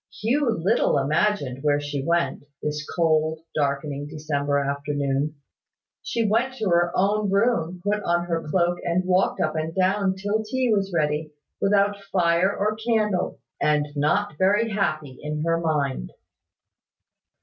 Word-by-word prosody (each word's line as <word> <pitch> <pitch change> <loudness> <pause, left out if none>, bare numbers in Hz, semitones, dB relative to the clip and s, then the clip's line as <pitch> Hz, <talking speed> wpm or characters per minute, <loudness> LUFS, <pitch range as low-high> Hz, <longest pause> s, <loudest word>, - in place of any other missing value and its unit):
Hugh 255 +5 +1
little 215 +2 +2
imagined 145 -2 0
where 145 0 +2
she 145 -1 -4
went, 170 -2 0 0.2
this 150 0 -2
cold, 160 -1 +2
darkening 145 0 -1
December 145 -2 -1
afternoon. 140 +1 -1 0.7
She 230 -2 -1
went 240 +5 +1
to 215 -6 -1
her 175 0 +3
own 205 +2 +2
room, 190 -4 +1
put 210 +1 0
on 175 -2 0
her 165 -1 -1
cloak, 175 +1 +1
and 175 +2 0
walked 185 +1 +2
up 155 -1 0
and 160 +1 -3
down 190 0 +2
till 205 +3 -1
tea 250 +1 0
was 195 -1 0
ready, 150 -2 -1 0.3
without 200 0 +2
fire 180 -1 +2
or 215 +1 -1
candle, 215 -4 0 0.2
and 150 -1 +2
not 155 +3 0
very 205 +4 +3
happy 155 -9 -2
in 150 0 -3
her 165 0 +1
mind. 145 - -1
170 Hz, 140 wpm, -24 LUFS, 150-205 Hz, 0.7 s, her